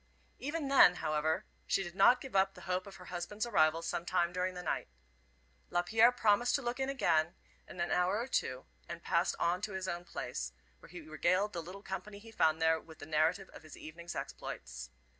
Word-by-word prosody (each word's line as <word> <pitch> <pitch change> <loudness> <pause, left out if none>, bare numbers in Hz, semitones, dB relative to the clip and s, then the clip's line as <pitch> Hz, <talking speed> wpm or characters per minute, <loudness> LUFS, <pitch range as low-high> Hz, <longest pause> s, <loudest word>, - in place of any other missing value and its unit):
Even 295 +3 -3
then, 270 -10 +7
however, 155 -1 0 0.2
she 195 - +2
did 175 -2 -7
not 220 +7 +6
give 265 -6 -8
up 195 0 +3
the 180 - -12
hope 180 +2 -2
of 195 - -10
her 180 - -12
husband's 205 +6 -3
arrival 165 -7 +3
sometime 175 +1 0
during 180 0 -1
the 180 - -6
night. - - -2 0.8
Lapierre 220 +7 +4
promised 240 0 +3
to 280 - 0
look 240 +2 -2
in 265 0 0
again 165 -12 +2 0.3
in 180 - -11
an 175 - -1
hour 180 +3 +2
or 235 - -1
two, 130 - -1 0.2
and - - -7
passed - - +1
on 175 +2 +1
to 205 -1 -4
his 190 0 -3
own 175 -1 -3
place, 60 - -5 0.3
where - - -15
he 180 -1 -9
regaled 175 +6 +1
the 170 - -3
little 185 +4 -10
company 200 +2 -6
he 225 +2 -13
found 160 -7 +2
there 160 0 +3
with 160 -1 -14
the 145 - -9
narrative 160 +5 +1
of - - -11
his 155 -2 -12
evening's 170 +2 -8
exploits. - - -6
180 Hz, 205 wpm, -33 LUFS, 160-205 Hz, 0.8 s, then